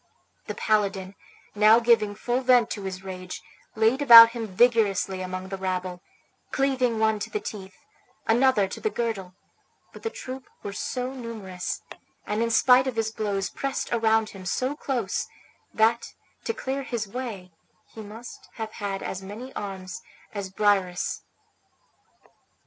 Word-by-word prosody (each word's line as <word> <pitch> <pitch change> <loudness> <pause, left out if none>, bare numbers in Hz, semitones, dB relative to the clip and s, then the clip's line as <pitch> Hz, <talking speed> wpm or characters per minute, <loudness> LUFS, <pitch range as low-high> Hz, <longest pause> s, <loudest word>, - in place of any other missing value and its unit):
The - - -4
paladin, 200 -3 0 0.4
now 215 +2 +6
giving 225 -3 +3
full 240 +4 -1
vent 250 -3 +4
to 205 - -4
his 190 0 -5
rage, 185 -1 -7 0.4
laid 225 +5 +2
about 230 -4 +11
him 230 -2 -4
vigorously 200 -3 +2
among 185 0 -5
the 195 0 -5
rabble, 185 -1 -3 0.5
cleaving 260 -4 +1
one 220 -1 +2
to - - -4
the 425 - -2
teeth, 195 - -8 0.5
another 235 -3 +3
to - - -7
the 435 - +1
girdle; 210 - -3 0.6
but - - -11
the 450 - -2
troop 260 - -8 0.2
were 200 - -5
so 250 +5 -3
numerous, 220 -8 -5 0.4
and 210 +2 -1
in 230 - +1
spite 255 +2 +5
of 260 - -2
his 225 -1 -1
blows 200 -3 -2
pressed 275 -2 -3
around 225 -1 +2
him 195 -2 -10
so 255 +9 -1
close, 250 -9 -2 0.4
that, 230 +1 +1 0.3
to - - +1
clear 270 +1 -3
his 235 -5 -3
way, 200 -5 -6 0.4
he 220 - -8
must 220 +3 -11
have 220 -1 -5
had 200 -3 -4
as 190 - -4
many 215 +7 -8
arms 190 -2 -6 0.3
as 200 -2 -4
Briareus. 190 -3 +1
220 Hz, 150 wpm, -26 LUFS, 195-240 Hz, 0.6 s, about